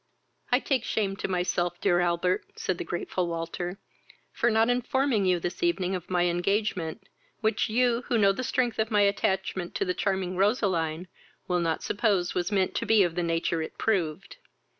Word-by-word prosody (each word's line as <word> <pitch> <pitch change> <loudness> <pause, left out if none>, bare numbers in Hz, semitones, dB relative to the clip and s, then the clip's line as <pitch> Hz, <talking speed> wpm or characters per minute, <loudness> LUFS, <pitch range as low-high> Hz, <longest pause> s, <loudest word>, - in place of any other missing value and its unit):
"I 250 - +6
take 265 -3 0
shame 200 -5 -1
to - - -3
myself, 175 -1 -1
dear 175 -3 +2
Albert, 175 +1 +1
(said 185 -2 -2
the - - -2
grateful 175 +1 -2
Walter,) 170 +2 -4 0.5
for 235 - +1
not 220 0 +3
informing 245 -3 +1
you 180 -1 +3
this 175 +2 -4
evening 195 - +1
of 180 -2 -5
my 180 -1 +2
engagement, 180 +1 -1 0.3
which 220 0 +1
you, 240 +1 +2
who 245 - +2
know 200 -2 +5
the 225 +6 -4
strength 250 -2 0
of 220 0 +1
my 210 -2 +3
attachment 195 -2 0
to 395 - 0
the 365 - 0
charming 190 - -1
Roseline, 185 -5 +1 0.4
will 180 -1 +1
not 165 -2 -1
suppose 200 -5 +1
was 180 +3 -1
meant 190 -2 +1
to - - -1
be 220 -2 +5
of 175 -2 0
the 175 - -1
nature 165 -1 0
it 160 - -6
proved. 190 - -1
190 Hz, 180 wpm, -27 LUFS, 175-220 Hz, 0.5 s, I